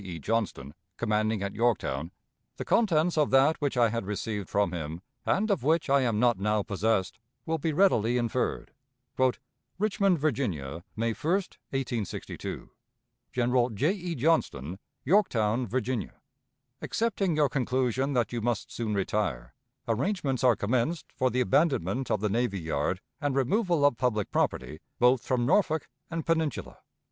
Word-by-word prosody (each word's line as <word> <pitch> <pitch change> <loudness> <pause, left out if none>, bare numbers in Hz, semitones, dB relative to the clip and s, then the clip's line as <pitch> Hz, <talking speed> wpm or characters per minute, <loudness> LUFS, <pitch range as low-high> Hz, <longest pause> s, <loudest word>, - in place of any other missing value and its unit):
E. 90 -3 -6
Johnston, 80 -7 -2 0.2
commanding 110 -2 0
at 100 - -3
Yorktown, 90 - 0 0.5
the - - -5
contents 175 -7 +2
of 150 - +3
that 135 +5 +4
which 140 -3 -1
I 120 -2 +5
had 115 -3 -3
received 105 -1 -3
from 100 -3 +1
him, 80 -1 -5 0.3
and 210 +2 +2
of 195 - +1
which 155 +1 +1
I 140 0 +5
am 115 -4 +1
not 120 -4 +3
now 105 +1 +1
possessed, 100 0 0 0.3
will 160 0 -1
be 160 +2 0
readily 125 - +3
inferred: 120 +1 -1 1.1
"RICHMOND, 200 -2 +2
VIRGINIA, 95 - -2
May 115 +1 0
1, 155 +9 -1
1862. 135 - -4 0.6
"General 125 0 +2
J. 130 - +1
E. 180 -4 -4
JOHNSTON, 95 - 0 0.3
Yorktown, 125 - +2
Virginia. 125 -1 -2 0.6
"Accepting 200 -7 0
your 150 -1 +4
conclusion 130 +1 0
that 120 -3 0
you 120 - -2
must 120 -2 -2
soon 110 -3 -2
retire, 100 - -1 0.3
arrangements 135 - -1
are 125 -3 +5
commenced 130 +10 -1
for 130 - +1
the 125 0 0
abandonment 130 - +1
of 105 - 0
the 105 - +1
navy 110 -2 0
yard 80 +2 -1 0.2
and 145 -2 0
removal 165 - +2
of 145 -5 +3
public 110 -6 0
property 75 - -1 0.2
both 125 0 +4
from 125 -2 0
Norfolk 160 0 +2 0.2
and 165 -1 -4
Peninsula. 160 -3 -1
125 Hz, 145 wpm, -28 LUFS, 105-150 Hz, 1.1 s, I